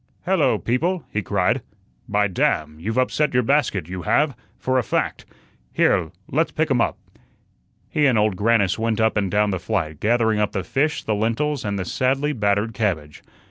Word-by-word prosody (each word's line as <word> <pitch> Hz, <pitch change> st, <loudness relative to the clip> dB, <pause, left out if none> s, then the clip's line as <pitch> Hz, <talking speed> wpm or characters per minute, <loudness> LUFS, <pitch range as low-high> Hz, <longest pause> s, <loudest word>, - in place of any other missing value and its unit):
"Hello, -, -, +2 dB
people," 170 Hz, +9 st, -1 dB
he 110 Hz, -, 0 dB
cried. 95 Hz, -2 st, 0 dB, 0.5 s
"By 105 Hz, 0 st, +2 dB
damn! 80 Hz, -4 st, 0 dB
you've 110 Hz, +8 st, -3 dB
upset 130 Hz, +2 st, +1 dB
your 125 Hz, -, +4 dB
basket 115 Hz, -, +1 dB
you 90 Hz, 0 st, -5 dB
have, 145 Hz, -, +1 dB, 0.2 s
for 130 Hz, 0 st, +1 dB
a -, -, -1 dB
fact. -, -, -2 dB, 0.5 s
Here, 80 Hz, -, +2 dB, 0.2 s
let's 160 Hz, +5 st, +2 dB
pick 160 Hz, -1 st, -1 dB
um 125 Hz, -3 st, +3 dB
up." -, -, 0 dB, 0.9 s
He 150 Hz, -1 st, +2 dB
and 125 Hz, -4 st, +3 dB
Old 105 Hz, -2 st, +2 dB
Grannis 100 Hz, -1 st, +2 dB
went 115 Hz, -1 st, 0 dB
up 110 Hz, 0 st, +2 dB
and 100 Hz, -2 st, 0 dB
down 105 Hz, +1 st, +2 dB
the 95 Hz, -, -2 dB
flight, 80 Hz, -3 st, -2 dB
gathering 110 Hz, -1 st, +2 dB
up 105 Hz, -1 st, 0 dB
the 95 Hz, -, -2 dB
fish, 150 Hz, +3 st, 0 dB
the 110 Hz, -, -1 dB
lentils, 115 Hz, +7 st, -1 dB
and 100 Hz, -1 st, -2 dB
the 95 Hz, -, -3 dB
sadly 135 Hz, +8 st, 0 dB
battered 105 Hz, -1 st, 0 dB
cabbage. 85 Hz, -9 st, -2 dB
110 Hz, 180 wpm, -22 LUFS, 100-130 Hz, 0.9 s, your